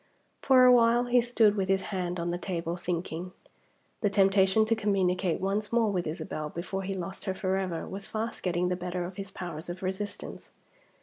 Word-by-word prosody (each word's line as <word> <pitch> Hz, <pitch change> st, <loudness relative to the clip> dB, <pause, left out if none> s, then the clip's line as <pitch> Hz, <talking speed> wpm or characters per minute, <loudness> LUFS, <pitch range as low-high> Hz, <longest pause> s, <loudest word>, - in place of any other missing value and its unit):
For 260 Hz, -2 st, +6 dB
a 250 Hz, -, +8 dB
while 240 Hz, 0 st, +5 dB
he 245 Hz, 0 st, +3 dB
stood 230 Hz, -3 st, +3 dB
with 195 Hz, -2 st, -1 dB
his 195 Hz, 0 st, +2 dB
hand 180 Hz, -1 st, -2 dB
on 170 Hz, 0 st, -1 dB
the 175 Hz, -, -3 dB
table, 170 Hz, -2 st, -3 dB
thinking. 175 Hz, 0 st, -4 dB, 0.7 s
The 205 Hz, -, +2 dB
temptation 195 Hz, +1 st, +4 dB
to 225 Hz, +1 st, +2 dB
communicate 190 Hz, -4 st, +1 dB
once 200 Hz, +3 st, -1 dB
more 230 Hz, -3 st, +3 dB
with 180 Hz, -4 st, -1 dB
Isabel 155 Hz, -1 st, -4 dB
before 185 Hz, +4 st, -4 dB
he 195 Hz, 0 st, -3 dB
lost 190 Hz, +2 st, -6 dB
her 190 Hz, -2 st, -1 dB
forever, 190 Hz, -3 st, -2 dB
was 195 Hz, +1 st, -6 dB
fast 225 Hz, +1 st, -4 dB
getting 180 Hz, 0 st, 0 dB
the 180 Hz, -, 0 dB
better 180 Hz, 0 st, -3 dB
of 185 Hz, +2 st, -8 dB
his 195 Hz, -1 st, -5 dB
powers 175 Hz, -4 st, -7 dB
of 180 Hz, +2 st, -6 dB
resistance. 200 Hz, +2 st, -5 dB
190 Hz, 190 wpm, -29 LUFS, 180-205 Hz, 0.7 s, a